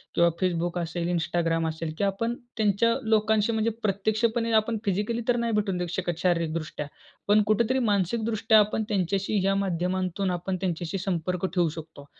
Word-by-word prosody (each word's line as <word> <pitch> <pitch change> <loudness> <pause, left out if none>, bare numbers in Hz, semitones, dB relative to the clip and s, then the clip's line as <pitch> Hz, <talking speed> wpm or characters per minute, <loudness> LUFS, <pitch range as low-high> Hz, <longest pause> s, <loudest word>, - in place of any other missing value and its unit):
किंवा 170 0 +5
Facebook 175 -1 0
असेल, 170 +1 -3
Instagram 165 -1 0
असेल 160 0 -5
की - - -1
आपण 215 +4 0 0.2
त्यांच्या 220 +2 +3
लोकांशी 220 0 +2
म्हणजे 220 0 +1
प्रत्यक्षपणे 220 +3 0
आपण 220 +1 -2
फिजिकली 210 +4 0
तर 245 - +3
नाही 235 -1 -1
भेटून 205 -3 0
देऊ 180 0 -2
शकत 175 -3 -2
शारीरिकदृष्ट्या, 165 -4 -1 0.4
पण 210 +1 +5
कुठेतरी 235 +5 +2
मानसिकदृष्ट्या 220 +3 +2
आपण 210 +1 +1
त्यांच्याशी 195 +1 0
ह्या 195 +1 +2
माध्यमांतून 185 0 -1
आपण 180 +2 -2
त्यांच्याशी 175 0 -2
संपर्क 180 0 -1
ठेवू 175 -2 +3
शकतो. 155 -2 -10
195 Hz, 155 wpm, -26 LUFS, 175-215 Hz, 0.4 s, किंवा